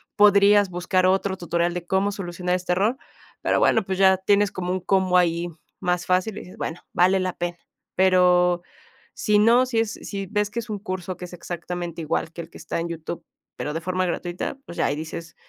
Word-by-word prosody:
podrías 205 -1 +6
buscar 185 +1 +1
otro 190 0 +1
tutorial 170 0 0
de 175 -1 -5
cómo 190 +2 +1
solucionar 180 -2 -3
este 180 0 -1
error, 210 +8 +1 0.4
pero - - +2
bueno, 225 - +3
pues, 190 0 -3
ya 190 0 +5
tienes 200 +2 +2
como 180 -3 -3
un 185 - 0
combo 185 -1 +2
ahí 170 -1 +2 0.3
más 180 0 -1
fácil 185 +3 +1
y - - -5
dices, 180 - -13
bueno, 165 - -4
vale 185 +2 +4
la 185 -1 -1
pena. 175 0 -4 0.4
Pero, 180 -1 +4 0.5
si 210 -1 +2
no, 235 +4 +5
si 245 -3 0
es 225 -1 0
si 195 -1 -6
ves 210 +1 -1
que 235 - -3
es 225 - -7
un 210 - -2
curso 185 -2 -5
que 180 - -7
es 180 - -12
exactamente 175 0 -5
igual 160 +1 -2
que 170 - -7
el 165 - -10
que - - -12
está - - -3
en 170 +1 -3
YouTube, 165 0 -6 0.3
pero 150 - -3
de 165 - -3
forma 185 +1 -1
gratuita, 175 +6 -3
pues 170 - -10
ya - - +2
ahí 145 - 0
dices, 165 +2 -7
185 Hz, 215 wpm, -24 LUFS, 175-195 Hz, 0.5 s, podrías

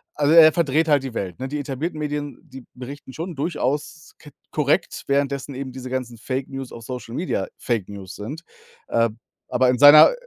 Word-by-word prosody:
also, 145 0 +2
er 160 -1 +9
verdreht 160 -1 +2
halt 145 -2 +4
die 130 -3 -6
Welt, 95 -2 -4
ne? 130 - -3
Die 145 +2 -4
etablierten 145 +4 -4
Medien, 145 -1 -3
die 135 -5 -12
berichten 130 +1 -9
schon 170 +5 -5
durchaus 150 +1 -3
ke 150 - -13 0.2
korrekt, 150 +4 0
währenddessen 140 0 -1
eben 130 0 -5
diese 130 0 -8
ganzen 125 -2 -4
Fake-News 135 +1 -4
auf 115 - -10
Social 125 -1 -7
Media 160 - -2
Fake-News 100 -5 -4
sind. 140 +11 -7 0.5
Äh, 115 0 +2 0.4
aber 130 - +3
in 125 - -1
seiner 145 - +9
135 Hz, 175 wpm, -23 LUFS, 125-150 Hz, 0.5 s, er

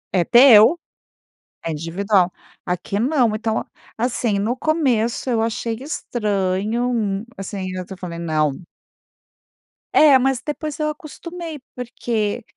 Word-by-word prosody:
É 175 - +4
teu, 240 - +7 0.9
é 165 - -1
individual. 180 +4 +1 0.3
Aqui 180 +3 -3
não. 250 -3 +2
Então, 220 0 -2 0.3
assim, 230 -3 0
no 220 +5 0
começo 260 -7 0
eu 230 -3 +1
achei 230 0 -2
estranho, 210 -4 -1
hum, 210 -3 -1
assim 195 +1 -6
ainda 185 -1 -4
até 190 +2 -8
falei: 170 -2 -7
"Não!". 155 -3 +1 1.4
É, 290 -3 +7
mas, 260 0 0
depois, 300 0 -5
eu 305 - 0
acostumei, 320 +1 -8 0.2
porque 235 -3 -3
225 Hz, 120 wpm, -21 LUFS, 195-260 Hz, 1.4 s, teu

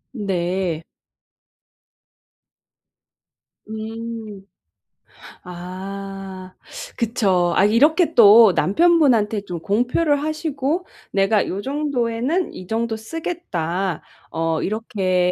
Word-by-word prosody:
네. 180 -4 -2 2.9
음. 220 -2 -7 1.0
아. 190 +1 -8 0.4
그쵸. 195 -7 +1
아 195 - +4
이렇게 310 - +3
또 220 -3 +8
남편분한테 240 - +3
좀 175 -4 -6
공표를 250 - +1
하시고 310 +2 -2 0.3
"내가 195 +2 +2
요 195 +2 -3
정도에는 275 - -1
이 185 - -10
정도 225 0 -1
쓰겠다." 195 - -4 0.3
어 165 -1 -1
이렇게 185 -4 0
215 Hz, 155 characters per minute, -21 LUFS, 185-255 Hz, 2.9 s, 또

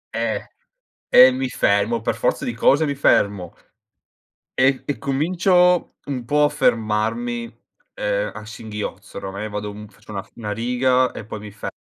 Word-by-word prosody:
Eh, - - -2 0.6
e 130 +1 +8
mi 130 +1 -2
fermo, 105 +2 +1
per 115 - -1
forza - - -1
di 120 - -2
cose 145 +6 +3
mi 140 - -2
fermo 100 -9 +2 1.0
e 130 +1 +2
e 145 - -3
comincio 180 +5 +2
un 130 -4 -4
po' 150 +4 +2
a 145 - +4
fermarmi, 115 +2 0 0.5
uhm, 105 0 -1
a 110 0 -8
singhiozzo. 110 -2 -7
Oramai 100 +2 -5
vado 105 0 -4
un 105 +1 -10
faccio 105 0 -16
una 100 -2 -3
f - - -22
una 105 -3 -5
riga 125 +3 +1
e 110 - -8
poi 110 0 -7
mi 105 0 -9
fermo 105 - -6
115 Hz, 160 wpm, -21 LUFS, 105-130 Hz, 1.0 s, e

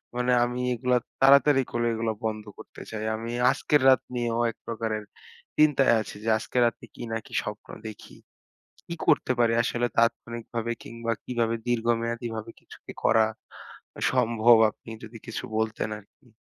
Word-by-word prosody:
মানে 125 0 +1
আমি 125 +1 -2
এগুলা, 125 +1 +1 0.2
তাড়াতাড়ি 140 0 +6
করে 120 0 -1
এগুলা 110 0 -1
বন্ধ 110 -1 -2
করতে - - -12
চাই। 110 -1 -5
আমি 115 +1 -5 0.2
আজকের 145 +1 +1
রাত 130 - +5
নিয়েও 120 -1 -1
এক - - -23
প্রকারের 110 -2 -3 0.5
চিন্তায় 145 -4 +5
আছি, 110 - -8
যে 115 - -1
আজকে 115 +3 -6
রাতে 115 - -2
কি - - -8
না 115 - 0
কি - - -15
স্বপ্ন 105 0 -7 0.2
দেখি? 110 - -11 0.7
কি - - -4
করতে - - +3
পারি? 115 -1 +4
আসলে, 120 +1 0
তাৎক্ষণিকভাবে 115 0 -1
কিংবা 115 0 -4
কিভাবে 115 -2 -1
দীর্ঘমেয়াদীভাবে 115 -1 -1
কিছু - - -15
কি - - -8
করা 110 -1 +5 0.9
সম্ভব? 115 0 +4
আপনি 110 - -15
যদি 115 +1 -9
কিছু 115 - -5
বলতেন 110 -1 -1
আরকি। 120 +5 -24
115 Hz, 155 wpm, -26 LUFS, 110-120 Hz, 0.9 s, তাড়াতাড়ি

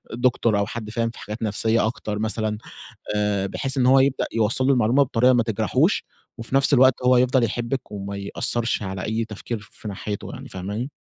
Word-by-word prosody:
Doctor 120 -2 +2
أو 100 0 +1
حد 110 0 -6
فاهم 115 +1 -1
في 115 - -11
حاجات 105 +2 -6
نفسية 110 +1 +1
أكتر 105 -2 -4
مثلًا، 110 0 -1 0.6
آآ 105 -2 0
بحيث 135 +7 -2
إن 125 - +3
هو 135 +1 +6
يبدأ 135 0 +2
يوصّل 115 +3 +2
له 140 - +5
المعلومة 125 +2 +3
بطريقة 125 -1 +3
ما 120 -1 +3
تجرحوش، 115 -2 +1 0.3
وفي 115 +3 -6
نفْس 140 +1 +4
الوقت 130 0 +6
هو 125 0 +5
يفضل 125 0 +3
يحبِّك 120 +3 -3
وما 100 0 -5
يأثّرش 115 +4 -1
على 95 -1 -4
أي 110 +1 -1
تفكير 110 +2 -5
في 110 - -9
ناحيته 100 +1 -5
يعني، - - -9
فاهماني؟ 105 +8 -5
115 Hz, 190 wpm, -23 LUFS, 105-125 Hz, 0.6 s, هو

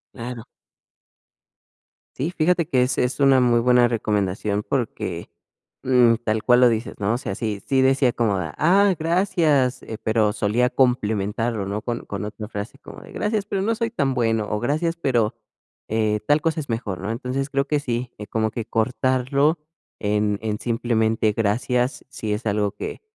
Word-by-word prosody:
Claro. 120 -1 -7 1.7
Si 155 +7 -1
fíjate 170 0 +1
que 130 -5 +1
es 125 +1 0
es 125 +3 0
una 135 -2 +5
muy 120 -1 +4
buena 125 0 +4
recomendación 105 -2 -1
porque, 105 -10 -3 0.5
mm, 125 -2 +5
tal 110 0 -1
cual 125 0 +5
lo 125 - +7
dices, 115 +1 -2
¿no? 100 +2 +1
O 120 - 0
sea, - - -5
si 110 -4 -3
si 130 +6 +1
decía 135 -1 +3
como 105 -5 0
de 85 - -3
que: - - -10
"Ah, 190 +4 +4
gracias, 160 -6 +1
eh". 110 - -7
Pero 110 -1 +2
solía 115 +3 +1
complementarlo, 110 -3 0
¿no? 100 +2 -3
Con 120 -1 -4
con 100 0 -5
otra 105 0 -7
frase 105 +4 -6
como - - -12
de: - - -13
"Gracias, 210 -1 -1
pero 195 -1 -2
no 225 +3 +1
soy 230 0 -1
tan 140 - 0
bueno". 115 -3 0
O: 105 +1 -2
"Gracias, 155 +6 0
pero, 120 -9 0 0.5
eh, 110 -1 0
tal 145 +1 +4
cosa 160 -1 0
es 140 - -10
mejor, 110 -5 -3
¿no?". 105 +3 -3
Entonces 130 +4 -3
creo 140 -1 0
que 150 -1 0
sí, 120 -1 -3
eh, 105 - -8
como 110 -1 0
que 115 +1 -4
cortarlo 130 +7 +1 0.4
en 105 -1 0
en 110 -1 -2
simplemente: 110 -2 +1
"Gracias". 120 +4 0
Sí, 110 -5 -5
es 105 +3 -4
algo 105 -1 0
que, - - -7
120 Hz, 180 wpm, -23 LUFS, 110-135 Hz, 1.7 s, lo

